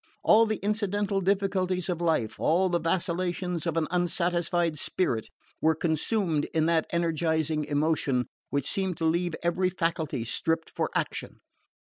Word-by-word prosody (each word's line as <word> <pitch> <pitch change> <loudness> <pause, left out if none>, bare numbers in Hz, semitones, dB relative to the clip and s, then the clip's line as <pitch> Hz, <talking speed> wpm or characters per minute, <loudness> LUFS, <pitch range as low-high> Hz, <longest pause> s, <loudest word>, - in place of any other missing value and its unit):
All 225 +1 +6
the 215 - 0
incidental 205 -1 0
difficulties 190 -1 0
of 175 -2 -2
life, 160 -10 0
all 180 +4 +3
the 175 -1 +1
vacillations 175 0 -1
of 165 -1 -1
an 160 -2 +1
unsatisfied 175 -2 +1
spirit, 120 -12 -1 0.3
were 160 0 +3
consumed 160 0 0
in 160 -1 +3
that 165 -1 +2
energising 160 -2 0
emotion 145 -4 +1 0.2
which 140 -2 -1
seemed 190 -3 -1
to 165 - -1
leave 170 +1 +1
every 180 +2 +1
faculty 165 -8 -2
stripped 165 +6 -1
for - - 0
action. - - -2
170 Hz, 140 wpm, -28 LUFS, 160-185 Hz, 0.3 s, All